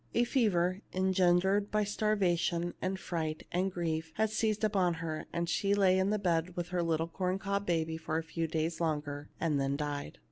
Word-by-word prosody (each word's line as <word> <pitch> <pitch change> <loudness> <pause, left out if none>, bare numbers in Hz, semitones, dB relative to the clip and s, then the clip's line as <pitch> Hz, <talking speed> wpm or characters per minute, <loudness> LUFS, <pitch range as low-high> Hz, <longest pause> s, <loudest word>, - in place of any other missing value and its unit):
A 235 - +4
fever, 200 -7 +1
engendered 190 +2 +3
by 215 0 +2
starvation 180 -5 +1
and 190 +1 -1
fright 160 -3 -3
and 185 +2 0
grief, 160 -2 -2
had 220 0 +1
seized 215 -1 0
upon 190 -5 +2
her, 160 -1 -4
and 170 0 -1
she 200 +3 +1
lay 190 -2 +4
in 190 +1 +2
the 210 - +2
bed 175 -2 0
with 175 -1 -3
her 180 -1 0
little 165 -1 0
corn 185 +2 -1
cob 200 0 -2
baby 160 -2 0
a 160 +1 +1
few 165 0 -3
days 160 +1 -2
longer, 145 -3 -2
and 155 -4 +1
then 135 0 0
died. 145 - -4
175 Hz, 185 wpm, -32 LUFS, 160-195 Hz, -, A